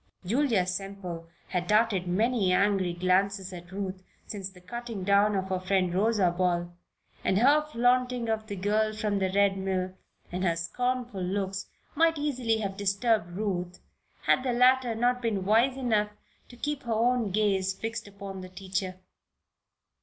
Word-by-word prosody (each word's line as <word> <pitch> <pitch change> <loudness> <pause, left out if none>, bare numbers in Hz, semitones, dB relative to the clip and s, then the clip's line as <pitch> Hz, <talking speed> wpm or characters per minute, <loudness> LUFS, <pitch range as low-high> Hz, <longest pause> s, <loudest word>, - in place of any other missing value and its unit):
Julia 230 -2 +2
Semple 185 -3 -5 0.2
had 180 -1 -1
darted 210 -3 +2
many 210 +1 +2
angry 195 -1 +2
glances 185 +2 +1
et 175 0 -10
Ruth 190 -1 -4 0.2
since 195 -2 -5
the 190 -1 -16
cutting 225 +2 -6
down 200 +2 +4
of 190 -1 -2
her 185 -1 0
friend, 185 -1 +1
Rosa 200 -2 +2
Ball, 175 -1 0 0.5
and 190 - +2
her 280 +7 +5
flaunting 250 -3 +1
of 220 -1 -1
the 205 - -4
girl 215 +3 +1
from 210 -2 -1
the 190 -1 +1
Red 200 -1 +3
Mill, 185 -1 -1 0.4
and 180 +1 -2
her 170 -3 +2
scornful 245 +4 -2
looks, 195 +1 -2 0.3
might 325 +1 +3
easily 255 -6 0
have 195 -2 -3
disturbed 200 -2 +1
Ruth 185 -4 -2 0.4
had - - +3
the 255 -1 -1
latter 250 -1 +4
not 245 +2 +1
been 210 -5 -1
wise 235 +6 +3
enough 220 -5 +1 0.4
to 245 - -12
keep 295 +2 -2
her 235 -2 -2
own 235 0 +2
gaze 195 -1 +1
fixed 225 +3 -5
upon 200 -1 -8
the 185 - -9
teacher. 185 0 -3
200 Hz, 160 wpm, -28 LUFS, 185-230 Hz, 0.5 s, her